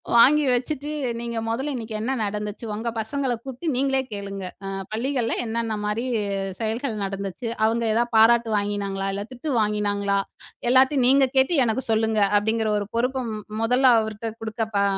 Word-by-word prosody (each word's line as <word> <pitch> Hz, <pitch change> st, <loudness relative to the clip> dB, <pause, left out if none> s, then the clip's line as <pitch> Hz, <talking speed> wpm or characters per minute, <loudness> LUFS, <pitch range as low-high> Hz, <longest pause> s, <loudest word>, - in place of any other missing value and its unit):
வாங்கி 290 Hz, +6 st, +7 dB
வச்சுட்டு, 280 Hz, +4 st, -2 dB, 0.3 s
"நீங்க 235 Hz, -1 st, -4 dB
மொதல்ல 270 Hz, +5 st, -2 dB
இன்னக்கி 225 Hz, -2 st, -5 dB
என்ன 245 Hz, +4 st, -1 dB
நடந்துச்சு? 210 Hz, +2 st, -4 dB
ஒங்க 225 Hz, +3 st, -2 dB
பசங்கள 260 Hz, +3 st, -1 dB
கூப்ட்டு 265 Hz, +5 st, -6 dB
நீங்களே 270 Hz, +1 st, +2 dB
கேளுங்க! 200 Hz, -1 st, -5 dB, 0.2 s
அ -, -, -4 dB, 0.2 s
பள்ளிகள்ல 240 Hz, +1 st, -1 dB
என்னென்ன 225 Hz, -1 st, -2 dB
மாரி 220 Hz, +4 st, -1 dB, 0.5 s
செயல்கள் 225 Hz, 0 st, -2 dB
நடந்துச்சு, 195 Hz, +3 st, -5 dB, 0.2 s
அவுங்க 230 Hz, +1 st, +1 dB
ஏதா 235 Hz, -, +3 dB
பாராட்டு 230 Hz, +1 st, +5 dB
வாங்கினாங்களா? 200 Hz, -1 st, -2 dB
இல்ல 200 Hz, -, -3 dB
திட்டு 275 Hz, +5 st, -5 dB
வாங்கினாங்களா? 205 Hz, -1 st, 0 dB, 0.5 s
எல்லாத்தையும் 260 Hz, 0 st, +4 dB
நீங்க 270 Hz, 0 st, +5 dB
கேட்டு 265 Hz, +6 st, +4 dB
எனக்கு 230 Hz, +3 st, 0 dB
சொல்லுங்க." 220 Hz, 0 st, +2 dB, 0.2 s
அப்பிடிங்கிற 220 Hz, +1 st, +1 dB
ஒரு 205 Hz, -, -4 dB
பொறுப்ப 250 Hz, +2 st, 0 dB
ம் 210 Hz, -1 st, -6 dB, 0.2 s
மொதல்ல 250 Hz, +3 st, +4 dB
அவர்ட்ட 220 Hz, +1 st, -4 dB
குடுக்க 225 Hz, 0 st, -3 dB
பா 200 Hz, -, +3 dB
225 Hz, 150 wpm, -24 LUFS, 210-255 Hz, 0.5 s, வாங்கி